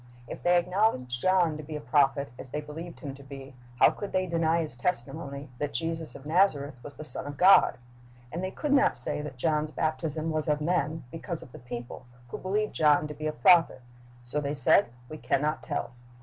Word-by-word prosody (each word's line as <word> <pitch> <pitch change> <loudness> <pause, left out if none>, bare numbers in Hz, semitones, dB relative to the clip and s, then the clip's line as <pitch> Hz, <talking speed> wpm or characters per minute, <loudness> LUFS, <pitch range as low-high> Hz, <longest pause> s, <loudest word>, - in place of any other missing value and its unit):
If - - -7
they 175 0 +4
acknowledged 175 - 0
John 180 -4 +3
to - - -6
be 155 +1 -7
a - - -3
prophet, 140 -3 +2
as 130 - -9
they 150 - -3
believed 160 +3 -8
him 140 -4 -5
to 140 - -13
be, 135 -1 -10 0.2
how - - +6
could 205 - -7
they 185 0 +2
deny 165 -1 +1
his 150 -6 -7
testimony 140 +1 -3
that 145 -1 -3
Jesus 165 -1 -3
of 135 - -11
Nazareth 155 -4 +2
was 145 +2 -10
the 155 - -8
Son 150 - -5
of 145 -1 -7
God? 190 +2 +6 0.5
And 170 +3 -4
they 185 - -1
could 285 +8 -2
not 270 - +4
say 125 +4 -2
that 145 -3 -7
John's 155 +2 0
baptism 155 +1 -2
was 155 0 -2
of 150 -1 +2
men, 160 -1 0
because 165 0 -6
of - - -15
the 155 - -11
people, 120 0 -8 0.2
who - - -6
believed 210 +3 -1
John 150 -1 +4
to - - -5
be 155 +1 -4
a - - 0
prophet. 155 0 +4 0.4
So 135 +5 0
they 145 +1 -2
said, 135 -3 +4 0.2
"We 155 +3 -8
can - - +1
not 150 +2 -1
tell." 145 -5 -3
150 Hz, 215 wpm, -28 LUFS, 140-165 Hz, 0.5 s, how